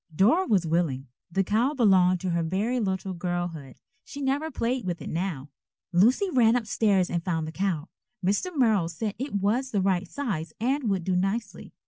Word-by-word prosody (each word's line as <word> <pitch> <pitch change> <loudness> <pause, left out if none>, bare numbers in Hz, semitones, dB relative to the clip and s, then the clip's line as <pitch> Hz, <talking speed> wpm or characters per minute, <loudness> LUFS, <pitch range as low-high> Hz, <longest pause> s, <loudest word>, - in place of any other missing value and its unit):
Dora 275 - +4
was 195 -6 +2
willing. 155 -6 -1 0.2
The 195 +3 +1
cow 230 +10 +1
belonged 185 -7 +4
to 185 -2 -1
her 170 0 +1
very 200 +9 -1
little 190 -3 -2
girlhood. 175 -6 -4 0.2
She 285 - -9
never 285 +3 0
played 250 -3 -1
with 175 -2 -3
it - - -6
now. 160 -5 -3 0.4
Lucy 235 - +4
ran 235 -5 +4
up 245 -2 0
stairs 200 -4 +2
and 170 -1 -1
found 165 -3 -1
the - - -5
cow. 175 -3 -2 0.4
Mr. 205 - +1
Merrill 215 -10 +3
said 200 +5 -3
it 270 -3 -4
was 215 +7 +1
the 210 - 0
right 190 -1 +1
size 175 - -4
and 255 +1 0
would 190 -3 0
do 185 +1 0
nicely. 195 +6 -2
195 Hz, 185 wpm, -26 LUFS, 175-235 Hz, 0.4 s, Dora